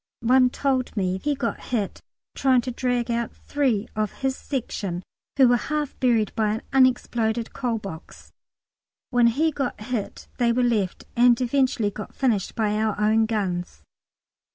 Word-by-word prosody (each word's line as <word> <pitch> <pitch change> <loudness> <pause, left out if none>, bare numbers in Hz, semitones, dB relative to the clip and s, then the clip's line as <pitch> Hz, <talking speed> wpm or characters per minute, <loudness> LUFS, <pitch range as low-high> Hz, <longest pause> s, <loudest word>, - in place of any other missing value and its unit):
One 255 +2 +5
told 260 -3 -1
me 185 -1 0
he 290 +7 -1
got 235 -3 -2
hit 215 -6 -2 0.3
trying 260 -2 +3
to 250 - -4
dig 245 -1 -1
out 235 0 -2
three 255 -8 -1
of 215 -1 -1
his 265 -1 +1
section 200 -11 -4 0.3
who 265 -2 +7
were 245 0 +4
half 300 -2 -1
buried 230 -5 +2
by 215 -1 +1
an 265 -1 +7
exploded 230 -2 -2
coal 245 -4 -1
box. 195 -6 -10 0.8
When 245 -2 +5
he 310 +8 +2
got 270 -4 -3
hit, 215 -1 -4
they 240 -1 +3
were 250 +1 +1
left, 215 -6 0
and 240 0 +5
eventually 255 -4 +1
got 210 +1 -8
finished 225 -8 0
by 210 -2 0
our 215 -1 0
own 220 +1 +3
guns. 180 - -3
235 Hz, 155 wpm, -24 LUFS, 215-255 Hz, 0.8 s, who